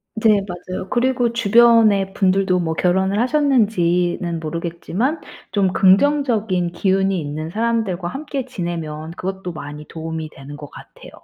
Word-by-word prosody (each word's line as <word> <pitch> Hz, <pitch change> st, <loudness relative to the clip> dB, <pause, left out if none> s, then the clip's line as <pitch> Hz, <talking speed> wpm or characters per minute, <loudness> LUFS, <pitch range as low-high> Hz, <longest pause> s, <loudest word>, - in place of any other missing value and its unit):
네 215 Hz, -2 st, +3 dB
맞아요. 185 Hz, +1 st, -6 dB
그리고 245 Hz, -1 st, +1 dB
주변의 225 Hz, -3 st, +4 dB
분들도 190 Hz, -1 st, +2 dB
뭐 160 Hz, -2 st, -2 dB
결혼을 190 Hz, +3 st, +1 dB
하셨는지는 200 Hz, -, +1 dB
모르겠지만 170 Hz, -, -3 dB, 0.3 s
좀 195 Hz, -3 st, +1 dB
긍정적인 210 Hz, -4 st, +2 dB
기운이 190 Hz, +1 st, +1 dB
있는 155 Hz, +1 st, -5 dB
사람들과 215 Hz, -4 st, -1 dB
함께 275 Hz, -, -5 dB
지내면 165 Hz, -8 st, -5 dB
그것도 185 Hz, 0 st, -5 dB
많이 150 Hz, -1 st, -8 dB
도움이 160 Hz, -1 st, -6 dB
되는 145 Hz, 0 st, -11 dB
것 145 Hz, -1 st, -10 dB
같아요 -, -, -14 dB
190 Hz, 320 characters per minute, -20 LUFS, 170-225 Hz, 0.3 s, 주변의